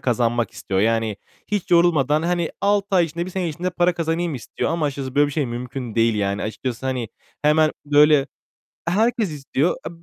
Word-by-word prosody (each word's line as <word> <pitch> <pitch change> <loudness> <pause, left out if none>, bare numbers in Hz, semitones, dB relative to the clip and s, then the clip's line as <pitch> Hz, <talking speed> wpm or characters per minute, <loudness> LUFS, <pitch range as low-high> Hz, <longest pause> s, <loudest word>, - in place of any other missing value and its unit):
kazanmak 120 -1 0
istiyor. 95 -1 -2
Yani 110 -1 +1 0.3
hiç 205 -4 -3
yorulmadan, 155 -4 +4
hani, 170 -1 0
6 200 0 +2
ay 175 - +5
içinde, 170 +2 -4
1 - - -6
sene 180 -2 -2
içinde 175 +4 -3
para 175 0 +2
kazanayım 165 -1 -1
istiyor. 125 - -3
Ama 165 -2 0
açıkçası 135 -2 -4
böyle 145 0 +4
bir 145 - -5
şey 145 -2 0
mümkün 125 0 -5
değil, 115 -1 +3
yani. 100 -1 -1
Açıkçası, 120 +3 -4
hani, 125 -4 -2 0.3
hemen, 155 +1 +4
böyle, 145 -1 +5 0.6
herkes 220 +1 +1
istiyor. 145 +2 -1
E, - - -4
150 Hz, 180 wpm, -22 LUFS, 120-175 Hz, 0.6 s, ay